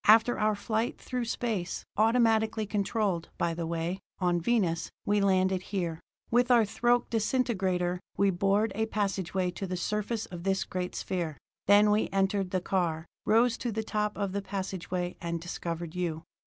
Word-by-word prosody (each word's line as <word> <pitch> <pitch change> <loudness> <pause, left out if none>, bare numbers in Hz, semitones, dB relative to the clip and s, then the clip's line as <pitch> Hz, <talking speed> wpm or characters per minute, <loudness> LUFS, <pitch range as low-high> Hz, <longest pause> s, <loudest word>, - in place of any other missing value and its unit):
"After 225 +3 +6
our 215 0 +2
flight 220 +3 -1
through 250 -2 -3
space, 220 -6 -2
automatically 220 -1 +3
controlled, 200 -3 -1
by 170 -1 0
the 165 0 -3
way, 170 +3 -2 0.2
on 175 -2 +1
Venus, 175 -5 +1 0.2
we 205 0 +2
landed 190 -1 +3
here. 175 -5 -3 0.3
With 245 +1 +3
our 235 -3 +6
thoque 240 +4 +1
disintegrator, 195 -7 +1 0.2
we 200 0 +4
bored 195 +4 +2
a 220 +1 0
passageway 190 -3 -1
to 195 +2 -5
the 180 0 -3
surface 210 +4 -2
of 175 -2 -8
this 190 +1 +1
great 180 -1 -4
sphere. 170 -6 -3 0.3
Then 205 +1 +6
we 210 +1 +2
entered 195 0 +1
the 185 0 0
car, 170 -4 0 0.2
rose 230 +2 +4
to 240 - -2
the 220 +1 -2
top 210 -1 -1
of 200 -2 -1
the 200 +1 -2
passageway, 185 -2 -3
and 170 0 -2
discovered 170 -1 -5
you. 170 -3 -2
195 Hz, 165 wpm, -29 LUFS, 180-220 Hz, 0.3 s, After